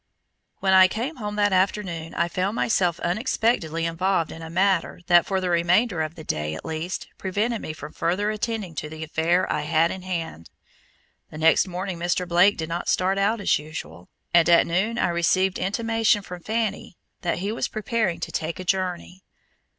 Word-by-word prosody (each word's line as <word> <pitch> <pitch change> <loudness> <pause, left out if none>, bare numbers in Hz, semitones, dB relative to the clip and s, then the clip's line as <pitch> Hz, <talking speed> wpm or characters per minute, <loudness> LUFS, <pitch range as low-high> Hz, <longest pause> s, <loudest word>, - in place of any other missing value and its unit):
When 190 -1 +3
I 185 0 +8
came 240 +11 -4
home 210 -3 -4
that 205 -1 +2
afternoon 185 -4 -1
I 170 - +1
found 185 +4 -2
myself 180 -8 +1
unexpectedly 175 - 0
involved 165 0 0
in 165 - -9
a 160 - -7
matter 185 0 +1
that 175 -1 +5
for 190 -1 0
the 185 -1 -1
remainder 175 +3 +2
of 155 +1 -3
the 160 - -9
day 75 - -2
at - - -9
least, 160 +3 -4
prevented 210 +5 -1
me - - -5
from 155 -1 -9
further 200 +5 0
attending 215 -4 -3
to 150 - -4
the 160 0 -7
affair 165 +3 +1
I - - -1
had 160 +3 +2
in 190 - -6
hand. 165 - -5 0.8
The - - -10
next 165 +4 +4
morning 185 0 -4
Mr. 175 +1 -1
Blake 180 +4 +4
did 160 - -3
not 170 +1 -3
start 190 +1 +1
out 210 +3 +1
as 200 - +2
usual, 90 - -9 0.2
and 170 -1 +5
at 170 - +6
noon 195 +7 0
I - - +1
received 180 +2 +1
intimation 225 +1 +1
from 180 -2 -8
Fanny 215 -3 -3 0.2
that 175 - -1
he 200 +4 -2
was 225 - -2
preparing 215 -4 -1
to - - -4
take 160 +2 -3
a - - -4
journey. 185 0 -2
180 Hz, 190 wpm, -24 LUFS, 165-200 Hz, 0.8 s, I